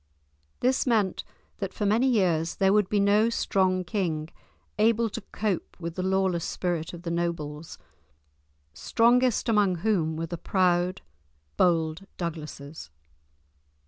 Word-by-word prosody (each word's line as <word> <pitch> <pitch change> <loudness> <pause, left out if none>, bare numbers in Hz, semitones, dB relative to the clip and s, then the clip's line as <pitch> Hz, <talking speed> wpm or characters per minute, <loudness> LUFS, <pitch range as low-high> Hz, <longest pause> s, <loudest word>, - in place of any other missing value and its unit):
This 260 +2 +1
meant 215 -6 +1 0.4
that 195 -2 -4
for 210 - -2
many 225 +6 +3
years 175 -9 +1
there 195 0 +3
would 210 -2 +3
be 210 - +1
no 205 +3 +4
strong 185 -5 +1
king 160 -4 -2 0.5
able 225 +1 +3
to 225 - -5
cope 205 -5 -3
with 170 -1 -5
the 185 - -4
lawless 190 -2 +1
spirit 175 -4 -2
of 175 -1 -10
the 170 - -3
nobles, 165 -3 -3 1.0
strongest 240 - +2
among 205 -5 +3
whom 165 -8 +1
were 165 +1 -3
the 170 0 -6
proud, 180 -1 +1 0.5
bold 165 +1 +1
Douglases. 155 - -6
185 Hz, 130 wpm, -27 LUFS, 165-210 Hz, 1.0 s, no